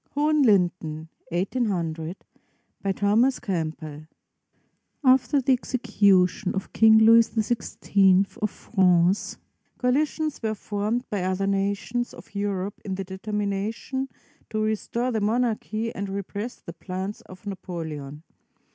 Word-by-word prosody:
HOHENLINDEN 185 - +2 0.2
BY 180 -1 -3
THOMAS 225 +7 +2
CAMPBELL 155 -6 -4 1.0
[After 265 +2 +4
the 265 0 +3
execution 205 -7 +2
of 195 - -4
King 220 -1 +7
Louis 225 +1 +7
XVI 200 -4 +2 0.2
of 215 - +1
France, 185 -2 +2 0.4
coalitions 300 +4 0
were 220 -1 -1
formed 215 +4 -2
by 205 -3 -1
other 185 +1 0
nations 200 +5 -1
of - - -14
Europe 200 -1 -3
in 190 -2 -3
the 195 - -3
determination 210 +6 -3 0.4
to 215 - -2
restore 230 +3 -1
the 220 -2 -1
monarchy 225 0 0
and 200 0 -4
repress 200 +4 -4
the 170 - -10
plans 190 +4 -5
of 185 +2 -13
Napoleon. 160 -7 -6
200 Hz, 110 wpm, -25 LUFS, 185-230 Hz, 1.0 s, King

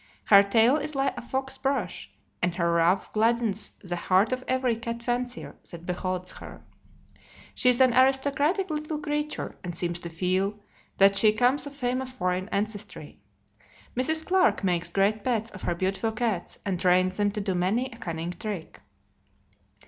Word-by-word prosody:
Her 200 -1 +8
tail 225 +7 +4
is 300 0 -4
like 270 0 0
a - - -6
fox's 265 +2 -4
brush, 265 -10 -2 0.3
and 175 -1 0
her 170 -1 +1
ruff 170 +3 +2
gladdens 220 -1 0
the 175 -2 -3
heart 185 +5 +2
of 255 0 -2
every 255 -2 +1
cat 230 +1 -5
fancier 245 0 -3
that 170 -1 -9
beholds 180 0 -3
her. - - -11 0.9
She 250 - +3
is 250 0 +3
an 255 -2 +5
aristocratic 280 +8 +2
little 305 0 -3
creature, 295 0 -3
and 175 -2 -5
seems 175 0 -1
to 170 - -6
feel 185 +4 -1 0.4
that 195 0 +6
she 215 +1 +6
comes 250 +7 +2
of 285 - -10
famous 255 -1 -1
foreign 185 -4 -2
ancestry. 205 0 -4 0.8
Mrs. 315 +6 +1
Clarke 370 - +3
makes 175 -3 0
great 200 +2 +1
pets 230 -3 -1
of 190 - -10
her 175 - -1
beautiful 195 +5 -1
cats, 215 -6 -2
and 190 -3 -1
trains 185 +1 +3
them 205 -1 +2
to 210 - -2
do 195 -2 -1
many 190 +8 +1
a 230 - -11
cunning 170 -3 -4
trick. 190 -3 -6
215 Hz, 165 wpm, -27 LUFS, 185-255 Hz, 0.9 s, Her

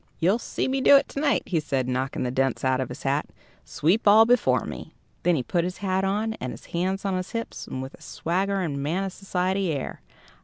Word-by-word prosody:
"You'll 190 +8 +2
see - - -2
me 265 0 0
do 280 - +8
it 275 - +1
to - - -5
night," 285 -1 +2
he 170 - 0
said, 135 -4 -1
knocking 130 +1 -1
the 125 - -1
dents 135 0 0
out 130 0 +2
of 130 - -3
his - - -8
hat - - 0 0.4
"sweep 175 - +1
all 215 +2 +8
before 245 +1 +3
me." - - -8 0.3
Then 175 -1 +3
he 130 - -1
put 170 +6 0
his 180 +1 -4
hat 190 -1 0
on, 210 +3 0
and 125 - -3
his - - -10
hands 190 +3 -1
on 195 -1 0
his 185 0 -5
hips, 230 0 -5
with 130 +1 -5
a - - -16
swaggering, 180 -4 -1
man 165 +7 -1
of 195 -1 -4
society 190 -1 -1
air. 140 -3 -4
185 Hz, 225 wpm, -25 LUFS, 140-200 Hz, 0.4 s, do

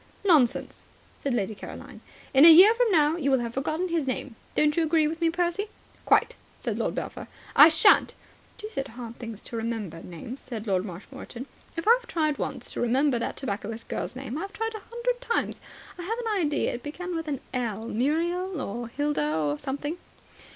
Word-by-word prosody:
"Nonsense," 300 -11 +3 0.4
said 280 - -1
Lady 205 -2 -1
Caroline. 200 - -10 0.3
"In 270 +1 +7
a 330 - +12
year 375 +7 +9
from 480 0 +2
now 315 -3 +3
you 280 -5 0
will 265 - +4
have 235 -2 -3
forgotten 310 +7 -1
his 330 -5 0
name. 255 -1 -3 0.2
Don't 300 0 +3
you 335 - +2
agree 315 -1 +3
with 325 +2 -4
me, 335 - +4
Percy?" 350 +4 -1 0.4
"Quite," - - +3 0.2
said - - -3
Lord - - -1
Belpher. - - -5 0.3
"I 300 - +10
shan't." 320 +6 +5 0.4
"Deuced 425 -11 -5
hard 235 -1 -9
things 225 -3 -7
to - - -8
remember, 225 -7 -4
names," 205 - -8
said 230 -4 -7
Lord 190 -2 0
Marshmoreton. 235 +7 -8 0.3
"If 330 - -4
I've 480 +1 +5
tried 310 -3 0
once - - -4
to - - -4
remember 255 +2 +2
that 230 - -3
tobacconist 220 -2 -5
girl's - - -3
name, 265 +2 -5
I've 395 +3 -6
tried 450 0 -3
a 435 - -5
hundred 485 +1 -2
times. 470 -2 -1 0.4
I - - -3
have 430 +7 -3
an 430 -7 0
idea 290 - 0
it 240 - -5
began 350 +6 -5
with 325 -1 -4
an 280 -3 -2
'L.' 225 -4 -2
Muriel 335 - 0
or 240 0 -4
Hilda 235 - -1
or 150 -2 0
something." 290 +5 -4
290 Hz, 190 wpm, -27 LUFS, 235-345 Hz, 0.4 s, a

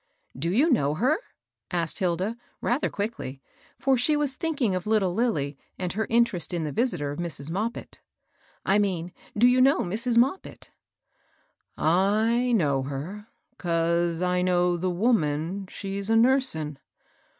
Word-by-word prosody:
'* - - -46
" - - -40
Do 150 +6 -2
you 270 - +3
know 150 - +2
her? 265 - +2 0.3
" - - -65
asked 170 0 0
Hilda, 185 +4 0 0.2
rather 250 +5 0
quickly, 200 - -4 0.4
for 270 -1 +2
she 295 +5 +2
was 290 -3 0
thinking 285 - 0
of 185 +1 -3
little 210 -5 +2
Lilly, 150 - -1 0.2
and 180 -2 -3
her 220 +3 -2
interest 230 -7 +1
in 165 - -1
the 150 - -3
visitor 150 - 0
of 145 - -6
Mrs. 160 -3 -3
Moppit, 215 +6 -4 0.3
— - - -41 0.3
I 195 +2 +3
mean 180 -4 -1 0.2
do 230 - +5
you 250 +1 +5
know 275 +3 +4
Mrs. 230 +6 -1
Moppit? 270 +10 0 0.3
" - - -42
" - - -45
I 215 +9 +2
know 145 - +2
her, 150 +11 -6 0.3
'cause 170 0 0
I 180 0 +1
know 180 -1 +2
the 180 +2 -1
woman 180 -2 0
she's 195 +1 -5
a 225 - +4
nursin.' 225 - +2
190 Hz, 165 wpm, -26 LUFS, 170-235 Hz, 0.4 s, do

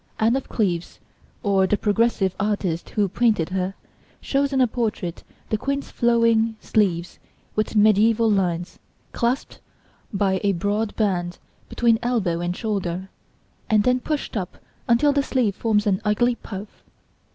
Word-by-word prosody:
Anne 225 +3 +3
of 270 - -3
Cleves, 175 -6 -1 0.4
or 195 -3 +3
the 210 - +1
progressive 210 -3 +1
artist 195 -5 -1
who 205 -2 +1
painted 210 -4 +1
her, 185 +1 -2 0.4
shows 280 0 0
in 270 - +1
a 255 - +6
portrait 215 -7 -3 0.3
the 215 - +1
Queen's 275 +3 -3
flowing 230 -1 +2
sleeves 180 -6 0 0.4
with 215 +1 -1
mediæval 215 +1 +4
lines, 175 -2 -2 0.3
clasped 240 +3 -2 0.5
by 195 -2 0
a 200 -1 +2
broad 205 +4 -1
band 180 -5 -1 0.3
between 230 -2 +2
elbow 215 -9 0
and 175 +1 -2
shoulder, 190 -4 -3 0.6
and 215 -2 +4
then 250 +2 +2
pushed 295 0 -3
up 185 -4 -4 0.3
until 245 +5 +4
the 285 - +2
sleeve 250 -7 0
forms 215 -2 +1
an 195 -1 +1
ugly 230 +4 +2
puff. 205 -3 -9
210 Hz, 140 wpm, -23 LUFS, 190-235 Hz, 0.6 s, a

